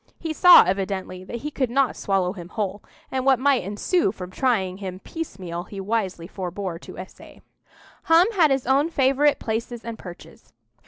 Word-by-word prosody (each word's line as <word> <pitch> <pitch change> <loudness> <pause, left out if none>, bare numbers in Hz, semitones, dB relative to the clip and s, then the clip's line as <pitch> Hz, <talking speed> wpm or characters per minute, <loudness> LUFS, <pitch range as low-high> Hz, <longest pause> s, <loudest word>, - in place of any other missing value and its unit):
He 325 -1 -4
saw 360 +3 +9
evidently 190 -1 -3
that 235 +4 -6
he 300 - -3
could 260 -4 -1
not 265 +1 +1
swallow 190 -2 0
him 175 -4 -10
whole, 205 -1 -3 0.3
and 260 -1 -1
what 265 -1 +4
might 270 +1 +2
ensue 205 - 0
from 185 -3 -9
trying 190 -6 0
him 190 -2 -6
piecemeal 185 - -6
he 200 +2 -9
wisely 195 -4 -2
forbore 185 -2 -5
to - - -12
essay. 185 - -11 0.7
Hum 330 +2 +6
had 345 -8 +4
his 270 -2 0
own 275 +5 +2
favourite 280 0 +2
places 230 +1 -4
and 230 -1 -6
perches. 175 -1 -13
215 Hz, 170 wpm, -23 LUFS, 185-270 Hz, 0.7 s, saw